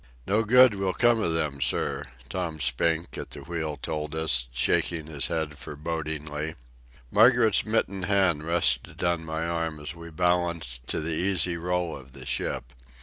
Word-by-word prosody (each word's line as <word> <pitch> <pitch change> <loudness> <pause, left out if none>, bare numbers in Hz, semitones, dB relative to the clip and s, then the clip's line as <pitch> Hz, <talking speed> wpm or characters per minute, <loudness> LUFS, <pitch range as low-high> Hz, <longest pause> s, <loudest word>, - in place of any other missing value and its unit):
"No 105 +3 +2
good 125 +1 +6
will 95 -2 -1
come 120 -1 +4
of 85 -6 0
them, 75 -4 -2
sir," 65 - +2 0.2
Tom 85 -4 -3
Spink, 80 +6 +1
at - - -6
the - - -9
wheel, 80 -3 -4
told 75 +2 -4
us, 70 -6 +2
shaking 75 +6 +1
his 75 -3 -1
head 80 -3 -3
forebodingly. 75 0 -4 0.6
Margaret's 110 -1 +5
mittened 100 -4 0
hand 95 -6 +2
rested 80 -7 +1
on 85 -2 +1
my 80 0 -3
arm 85 -2 -2
as 75 +2 -5
we 85 0 -10
balanced 85 -7 0
to - - -1
the 80 +1 -1
easy 90 0 +1
roll 90 0 -1
of 65 -1 -13
the 65 -2 -11
ship. 65 +2 -2
80 Hz, 160 wpm, -27 LUFS, 75-90 Hz, 0.6 s, good